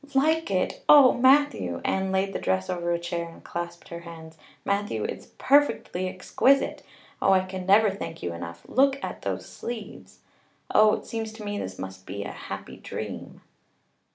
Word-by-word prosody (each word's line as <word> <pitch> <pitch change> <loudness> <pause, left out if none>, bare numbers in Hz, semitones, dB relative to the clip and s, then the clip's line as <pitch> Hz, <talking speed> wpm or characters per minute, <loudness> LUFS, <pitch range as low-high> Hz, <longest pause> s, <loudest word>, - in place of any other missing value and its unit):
"Like 315 +4 +2
it! 185 -2 -1
Oh, 285 -4 +9
Matthew!" 250 - +3
Anne 190 0 0
laid 190 +1 0
the - - -2
dress 95 0 0
over 175 -1 -2
a 170 - +2
chair 170 0 -4
and 165 - -15
clasped 170 0 -6
her 170 - -6
hands. 165 -1 -11 0.3
"Matthew, 200 - -1
it's - - -5
perfectly 275 -10 +2
exquisite. 255 +8 +2 0.4
Oh, 195 - +5
I 190 - +5
can 185 -1 -6
never 205 +1 +6
thank 190 -4 -7
you 85 - -2
enough. 85 0 -8
Look 270 +1 +3
at - - -5
those - - -3
sleeves! 230 -3 -8 0.6
Oh, 215 0 +6
it - - -8
seems 225 -1 -4
to 220 -1 -10
me 205 0 -3
this 95 0 -6
must 95 0 -8
be 100 +2 -4
a - - -6
happy - - -8
dream." - - -7
190 Hz, 175 wpm, -26 LUFS, 165-220 Hz, 0.6 s, Oh